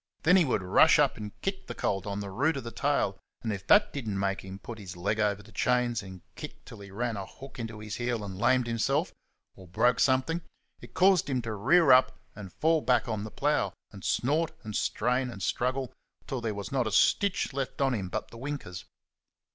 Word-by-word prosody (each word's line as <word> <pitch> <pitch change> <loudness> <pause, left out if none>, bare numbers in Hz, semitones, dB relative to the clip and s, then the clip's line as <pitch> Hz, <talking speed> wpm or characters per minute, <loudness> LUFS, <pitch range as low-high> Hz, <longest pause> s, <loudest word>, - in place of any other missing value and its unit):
Then 180 +3 +6
he 180 -3 +5
would 115 -7 0
rush 90 - +5
up - - +3
and 105 -1 -8
kick 195 0 -3
the 120 - -6
colt 95 -1 -1
on 100 0 -3
the 100 -1 -6
root 140 +9 +1
of 135 - -5
the 115 - -6
tail, 140 -10 0 0.2
and 110 -2 -1
if 95 -1 -7
that 210 0 +5
did 135 -6 -5
n't 100 - -2
make 100 0 -1
him 95 0 -8
put 110 +2 -9
his 90 -3 -9
leg 100 +5 -1
over 105 -1 0
the 105 - -17
chains 120 +1 +1
and 95 -2 -10
kick - - -9
till - - -11
he 100 0 -10
ran 115 +3 -2
a 95 - -4
hook 135 -1 -12
into 115 -2 -5
his 105 0 -6
heel 120 -3 -2
and 95 -2 -7
lamed 125 +1 +3
himself, 115 -1 0 0.4
or 95 - -14
broke 120 +7 +2
something, 135 +6 +2 0.4
it - - -14
caused 185 -4 +4
him 130 -2 +1
to 110 -1 -3
rear 135 - +4
up 130 +1 +5 0.2
and 100 -3 -9
fall 160 0 +2
back 125 -1 +2
on 110 -3 -2
the 110 - -6
plough 105 -6 0 0.2
and 100 -3 -12
snort 155 +6 +1
and 105 -2 -6
strain 125 +3 0
and 100 -5 -7
struggle 130 +4 -1 0.3
till 130 -3 -4
there 110 -3 -2
was 100 +5 -6
not 130 -4 +1
a - - -2
stitch 195 - +2
left 135 -1 -4
on 135 -2 +2
him 95 -6 -3
but - - -4
the 115 - -11
winkers. 130 -10 -6
115 Hz, 225 wpm, -29 LUFS, 100-135 Hz, 0.4 s, Then